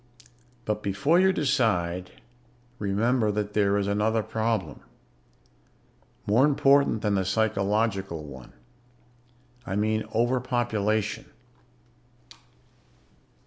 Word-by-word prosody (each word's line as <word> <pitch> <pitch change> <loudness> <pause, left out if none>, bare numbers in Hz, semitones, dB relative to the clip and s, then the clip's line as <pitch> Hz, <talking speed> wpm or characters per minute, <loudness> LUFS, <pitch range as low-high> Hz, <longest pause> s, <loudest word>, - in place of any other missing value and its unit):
"But 105 0 -2
before 100 - +1
you 190 +1 +4
decide, 105 - 0 0.7
remember 110 +3 +1
that 105 0 -3
there 100 -1 +2
is 100 - 0
another 105 +2 0
problem, 110 -3 -2 1.5
more 110 +6 +3
important 140 -4 +3
than 105 -2 +1
the 95 -1 +1
psychological 100 -3 -1
one. 65 -4 -11 1.1
I 95 - -4
mean 110 +1 0
overpopulation. 115 -3 -1
105 Hz, 85 wpm, -26 LUFS, 100-115 Hz, 1.5 s, you